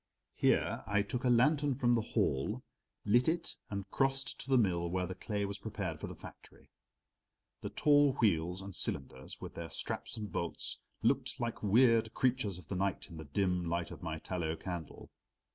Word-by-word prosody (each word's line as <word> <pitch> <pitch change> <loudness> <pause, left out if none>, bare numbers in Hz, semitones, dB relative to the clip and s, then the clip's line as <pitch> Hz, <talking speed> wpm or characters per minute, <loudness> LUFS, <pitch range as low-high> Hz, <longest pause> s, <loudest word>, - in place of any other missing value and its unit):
Here - - +2
I 105 0 +2
took 120 +5 -4
a 125 - +3
lantern 140 +3 +4
from 120 -2 +3
the 115 - +3
hall, 70 -9 0 0.4
lit 120 +7 +4
it 170 +1 -1
and 100 -1 -4
crossed 135 0 0
to - - -7
the 130 - +5
mill 90 -6 +2
where 90 +1 0
the 95 - -4
clay 100 +2 -2
was 100 0 -4
prepared 95 -7 -4
for - - -4
the - - -7
factory. - - -14 0.9
The - - -4
tall 145 -2 +4
wheels 90 - +1
and 100 0 -7
cylinders, 65 -4 -3
with - - -7
their 85 -1 -6
straps - - -3
and 105 -2 -5
bolts, 85 - -2 0.2
looked 135 - +1
like 120 -1 -2
weird 115 +1 +4
creatures 125 -7 +1
of 90 -4 -13
the 95 - -3
night 95 -1 -1
in 80 - -8
the 80 - -7
dim 90 +4 +1
light 85 -1 -1
of - - -9
my 80 -3 -3
tallow 80 -1 -2
candle. 85 -1 -7
100 Hz, 185 wpm, -34 LUFS, 85-120 Hz, 0.9 s, the